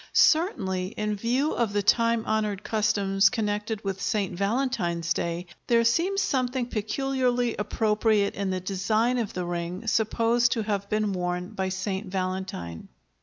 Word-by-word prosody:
Certainly, 190 - +2
in 210 0 -1
view 245 +8 0
of 230 -4 0
the 205 0 +1
time 230 +2 +3
honored 215 -2 -1
customs 200 -2 +2
connected 215 -1 -2
with 195 -1 -3
St. 205 -5 -1
Valentine's 195 -6 0
Day, 170 +1 -3 0.2
there 230 -1 +4
seems 360 +12 +2
something 255 -1 0
peculiarly 245 +2 0
appropriate 210 0 +1
in 200 -1 -2
the 185 0 -1
design 215 +6 +1
of 225 -4 -3
the 180 -1 -3
ring 175 +4 -4
supposed 230 +2 +2
to 225 -3 -1
have 200 -2 -2
been 215 -1 0
worn 180 0 -2
by 190 -3 -2
St. 190 +2 -3
Valentine. 185 - -4
210 Hz, 145 wpm, -26 LUFS, 190-235 Hz, 0.2 s, there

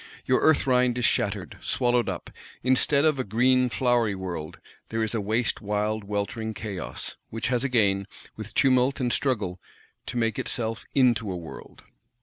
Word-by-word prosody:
Your 130 - +2
"Earth 160 -1 +4
rind" 125 -2 +3
is 125 - +1
shattered, - - -1
swallowed 120 -1 +1
up; - - -6 0.3
instead 135 +3 +3
of 155 -3 +2
a - - +1
green 125 +4 +3
flowery 120 -4 +1
world, 85 -5 -5 0.3
there 115 0 -1
is 110 - -1
a 115 - 0
waste 110 +4 0
wild 105 +1 -1
weltering 105 +2 -3
chaos:—which 105 +2 -5
has 125 -1 +1
again, 100 -7 +2 0.3
with 110 0 -8
tumult 130 +1 +3
and 125 -2 0
struggle, 100 -10 -1 0.5
to - - -4
make 115 -2 0
itself 115 -1 -2
into 120 -6 +3
a 90 - -3
world. 85 -2 -11
115 Hz, 155 wpm, -26 LUFS, 105-125 Hz, 0.5 s, Earth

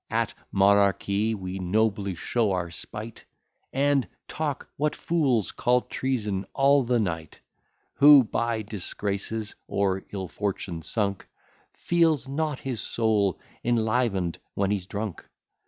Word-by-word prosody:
At - - 0 0.2
monarchy 100 +2 +3
we 95 -1 -5
nobly 100 0 0
show 110 +3 0
our 85 -2 -2
spight, 110 +6 -8 0.5
And 140 -1 +2 0.2
talk, 150 -3 -3
what 150 +1 0
fools 135 - +1
call 125 +1 +2
treason, 105 -9 -2
all 140 +1 +5
the 120 -1 +1
night. 80 -6 -3 0.6
Who, 145 -1 +9
by 115 0 -1
disgraces 105 +1 -4
or 95 -1 0
ill 95 -2 -4
fortune 95 -3 -3
sunk, 100 +3 -2 0.5
Feels 165 -5 +2
not 150 +1 -1
his 130 -4 -3
soul 105 -5 +1 0.2
enliven'd 110 -6 +1 0.2
when 100 0 +1
he's 95 -3 -2
drunk? 105 -2 -5
110 Hz, 120 wpm, -26 LUFS, 95-125 Hz, 0.6 s, Who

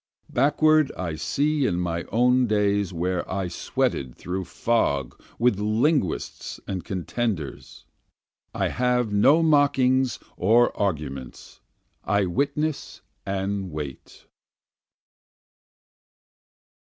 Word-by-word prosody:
Backward 150 +3 +3
I 85 -3 -3
see 145 - 0
in 90 - -1
my 85 -1 -2
own 125 +2 +3
days 100 -2 +1
where 90 +1 -1
I 95 -1 -1
sweated 65 -6 -2
through 90 +1 -4
fog 70 - -1 0.2
with 120 -4 +2
linguists 110 - 0
and 95 -3 -3
contenders, 95 - -4 0.7
I - - -1
have 125 -3 0
no 145 +11 +5
mockings 135 -4 +3 0.2
or 115 +6 +3
arguments, 75 - -4 0.4
I 100 0 +1
witness 145 - -2 0.3
and 95 0 -2
wait. 75 -4 -8
105 Hz, 90 wpm, -25 LUFS, 90-130 Hz, 0.7 s, no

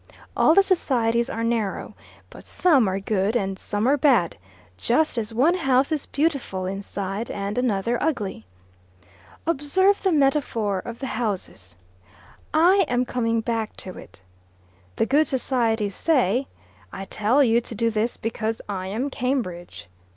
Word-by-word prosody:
All 315 - +4
the 395 - +7
societies 235 -10 +1
are 230 -4 -3
narrow, 230 -4 -2 0.4
but - - -12
some 285 - +3
are 190 +1 -1
good 200 +2 0
and 195 -4 -1
some 205 +3 -1
are 285 +2 +4
bad 250 - +3 0.4
just 255 - +1
as 230 -2 -2
one 265 +10 +3
house 270 -5 +2
is 305 -3 -2
beautiful 275 - -1
inside 195 +2 -4
and 200 +1 -4
another 235 -1 0
ugly. 200 - -2 1.0
Observe 335 +6 +2
the 380 - +1
metaphor 270 - +1
of 235 +5 -7
the 270 - -5
houses: 200 - -4 0.8
I 360 +5 +5
am 250 -1 +1
coming 230 -2 0
back 225 -1 -3
to 185 - -7
it. 100 - -14 0.7
The - - +1
good 290 +6 +3
societies 230 -5 0
say, 260 - +1 0.4
`I 195 - -7
tell 235 +7 +2
you 235 -1 +3
to 230 - -8
do 230 +2 +1
this 220 +2 -1
because 225 0 -3
I 190 -2 -4
am 240 +9 -3
Cambridge. 235 - -3
235 Hz, 145 wpm, -24 LUFS, 205-275 Hz, 1.0 s, the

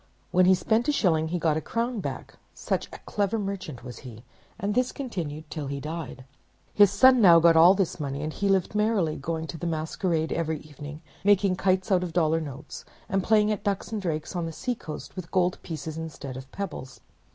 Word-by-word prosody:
When 185 0 +5
he 190 - +7
spent 220 +6 +1
a - - +4
shilling 160 - +2
he 175 +2 -2
got 160 -2 +2
back - - -1
a - - -9
crown, 235 +1 -3 0.3
such - - -2
a - - -10
clever 205 +1 0
merchant 195 - -5
was 120 -1 -8
he; 120 -3 -11 0.4
and 200 +2 -1
this 250 +2 +1
continued 160 - -5
till 150 -3 -4
he 140 0 -4
died. 150 -4 -6 0.5
His 205 -2 +7
son 255 +5 +6
now 170 -5 +8
got 165 0 +5
all 170 +4 +8
this 190 -3 -1
money; 140 0 -3
and 155 0 -3
he 200 - -1
lived 190 -1 +2
merrily, 210 -7 +1
going 160 +3 -3
to 165 0 -7
the 175 - -3
masquerade 160 +1 -1
every 160 -1 -1
evening, 150 +1 -10 0.2
making 200 -1 +4
kites 185 +1 +1
out 185 -2 +4
of 175 -2 -4
dollar 165 -1 +2
notes, 145 0 -8 0.3
and 195 -1 +1
playing 215 0 +3
at 210 - -3
ducks 200 +2 -2
and 215 -2 -2
drakes 160 -2 -3
on 170 -2 -1
the - - -5
seacoast 190 -4 -5
with 185 -3 -7
gold 180 -1 +1
pieces 160 -1 -6
instead 145 -5 -7
of 130 0 -9
pebbles. 130 - -6
170 Hz, 210 wpm, -26 LUFS, 155-200 Hz, 0.5 s, now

